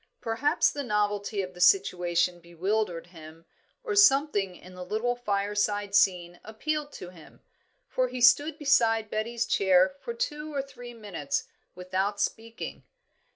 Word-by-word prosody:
Perhaps 230 +5 +1
the 290 - -4
novelty 205 -3 -1
of 185 0 -8
the 180 - -9
situation 175 - +3
bewildered 175 +1 -2
him, 165 -1 -14 0.4
or 435 -5 -3
something 270 - +4
in 185 +1 -14
the 180 0 -8
little 220 +6 -1
fireside 205 -2 -1
scene 175 -3 +2
appealed 295 +7 -3
to 180 - -9
him; 170 -4 -16 0.5
for 255 0 0
he 250 0 -6
stood 290 +5 +4
beside 225 -7 +2
Betty's 230 +2 -2
chair 190 +3 +3
for 470 - -6
two 310 -10 -4
or 275 - -1
three 245 -3 -11
minutes 195 -10 -3 0.3
without 190 +3 -2
speaking. 225 +2 -4
210 Hz, 140 wpm, -27 LUFS, 180-245 Hz, 0.5 s, something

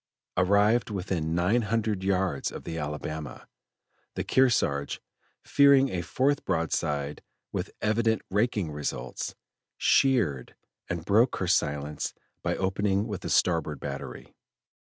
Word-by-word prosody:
Arrived 100 +6 +3
within 90 -5 -2
nine 95 +8 +2
hundred 110 -3 -1
yards 95 -6 0
of - - -8
the 85 - -5
Alabama, 75 0 -5 0.7
the - - -2
Kearsarge, 120 - +2 0.4
fearing 140 -1 +5
a 90 - -2
fourth 135 - 0
broadside 75 -3 -1 0.3
with - - -3
evident 110 +1 +1
raking 105 -5 +1
results, 70 -4 -4 0.4
sheered 100 - +2 0.3
and 85 -1 -3
broke 110 +6 +4
her 95 - -2
silence 75 -2 0 0.3
by - - -1
opening 95 +1 0
with 105 -5 -5
the - - -5
starboard 80 -5 +1
battery. 70 -1 -7
95 Hz, 115 wpm, -28 LUFS, 75-110 Hz, 0.7 s, fearing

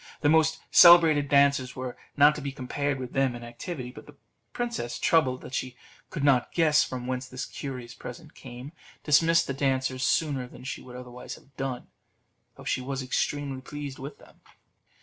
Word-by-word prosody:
The 145 - +3
most 160 0 +3
celebrated 165 -5 +7
dancers 140 -2 +3
were 130 -1 -5 0.2
not 145 +1 +7
to 150 - -7
be 140 -1 -4
compared 140 +1 -2
with 125 -1 -7
them 135 -2 +1
in 120 - -9
activity. 125 +2 -7
But - - -13
the 150 - -14 0.4
princess, 235 - -3
troubled 130 -6 +2
that - - -11
she 130 -1 -3 0.3
could 145 - -5
not 135 -4 +3
guess 155 -3 +4
from 125 -1 -5
whence 130 0 -3
this 130 0 -5
curious 125 -4 -7
present 150 +7 -10
came, 125 +2 -10 0.3
dismissed 165 +3 +4
the 135 - -3
dancers 130 -1 -1
sooner 135 -2 +1
than - - -13
she 125 -2 -5
would 125 -1 -12
otherwise 125 0 -8
have 135 -1 -21
done, 135 -2 -4 0.7
though - - -13
she - - -1
was 135 +1 -4
extremely 135 +1 -2
pleased 145 0 -7
with 140 +3 -8
them. - - -20
135 Hz, 180 wpm, -27 LUFS, 125-145 Hz, 0.7 s, celebrated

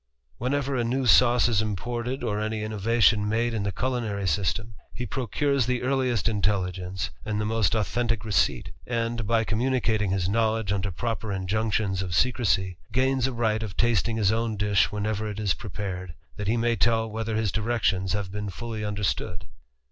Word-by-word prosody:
Whenever 140 +2 0
a 120 - +1
new 130 +3 0
sauce 120 0 +6
is 110 -3 +2
imported, 120 +5 -3
or 105 -3 -1
any 110 0 -2
innovation 110 0 +2
ade 115 +1 +1
in 110 - -1
the 100 0 -1
culinary 110 -3 -2
system, 100 +7 -1 0.2
he 125 - -3
procures 135 +2 0
the 125 -1 0
earliest 130 -5 +1
telligence, 95 -5 -1
and 105 -1 -2
the 105 - 0
most 110 -4 +1
authentick 115 +1 0
receipt; 95 - +1 0.2
and, 115 -2 -1
by 115 0 +2
immunicating 115 -3 +1
his 95 -2 0
knowledge 110 0 +1
under 100 0 0
proper 110 +4 -3
injunctions 100 0 0
of 90 -3 -3 0.2
crecy, 95 -5 0
gains 130 +1 +2
a - - -2
right 110 -2 0
of 105 -3 -6
tasting 115 -1 +2
his 105 -2 +3
own 110 -1 -1
dish 105 0 +2
whenever 105 +1 -2
it 105 0 -6
is 100 -3 +2
epared, 95 -5 -6 0.2
that 105 - -4
he 115 +3 +2
may 115 0 +2
tell 115 -1 +2
whether 110 0 -3
his 110 -3 0
directions 105 -5 0
have 100 -2 -2
been 105 0 -4
lly 110 +1 -5
understood. 100 -4 -2
110 Hz, 170 wpm, -26 LUFS, 100-120 Hz, 0.2 s, sauce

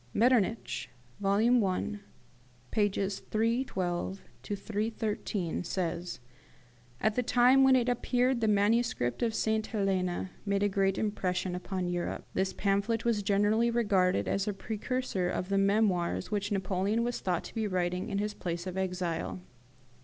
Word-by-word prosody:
Metternich 230 -1 +2 0.3
(vol, 195 0 +2
i. 215 -3 +2 0.7
pp. 200 -2 0
312 195 -5 -1 0.7
13) 205 -5 -2
says, 175 -2 -3 0.8
"At 215 - +2
the 250 - +1
time 250 +2 +5
when 265 0 +6
it 250 -1 +2
appeared 245 0 +1
the 220 - +2
manuscript 210 - +2
of 230 -2 +1
St. 220 0 0
Helena 190 -4 -1
made 200 -1 0
a 205 - +3
great 195 -1 +1
impression 185 -3 -1
upon 180 0 -3
Europe. 175 0 -3
This 190 0 0
pamphlet 200 +3 0
was 230 -3 +2
generally 205 +3 +2
regarded 190 - +2
as 195 - 0
a 210 - 0
precursor 215 -1 -2
of 180 +1 -3
the 195 0 +2
memoirs 195 -3 +1
which 205 0 -1
Napoleon 195 +3 0
was 240 0 -2
thought 180 -2 -1
to - - -10
be 220 -2 -1
writing 180 -1 -1
in 200 - -1
his 210 +1 -1
place 170 -2 -4
of 185 0 -3
exile. 180 -2 -2
200 Hz, 140 wpm, -30 LUFS, 185-225 Hz, 0.8 s, when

